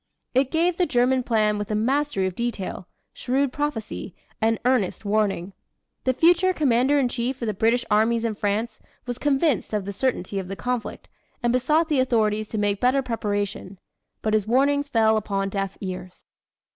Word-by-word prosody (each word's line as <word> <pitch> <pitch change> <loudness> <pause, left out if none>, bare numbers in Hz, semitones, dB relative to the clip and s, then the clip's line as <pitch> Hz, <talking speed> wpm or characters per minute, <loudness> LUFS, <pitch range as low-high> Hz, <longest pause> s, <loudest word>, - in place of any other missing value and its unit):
It 260 +1 +2
gave 335 +2 +1
the 360 - +2
German 255 +1 +2
plan 215 -3 +1
with 205 - -4
a 215 - 0
mastery 260 -1 +1
of 185 - -2
detail, 210 -4 -4 0.3
shrewd 265 +1 0
prophecy, 245 - -4 0.3
and 225 +1 +2
earnest 245 -5 +1
warning. 200 -3 0 0.5
The 260 - +3
future 350 +6 +4
commander 270 -2 +2
in 270 -3 +3
chief 245 +2 -3
of 235 - -3
the 215 - -1
British 230 +5 +1
armies 225 +2 +3
in 230 -2 0
France 210 +3 -2 0.3
was 245 -1 -5
convinced 285 -4 +1
of 205 -2 -2
the 200 - -4
certainty 200 -4 -1
of 190 - -6
the 195 - -5
conflict 245 +1 -4 0.4
and 240 0 +2
besought 300 +6 +2
the 300 -4 +1
authorities 215 -4 +1
to 220 - -4
make 205 -1 0
better 260 +2 +3
preparation 205 -4 -3 0.5
but 215 - 0
his 215 -1 +1
warnings 285 +4 +2
fell 220 -3 +3
upon 195 -2 -1
deaf 195 -1 -3
ears. 185 -1 -7
230 Hz, 175 wpm, -24 LUFS, 205-265 Hz, 0.5 s, future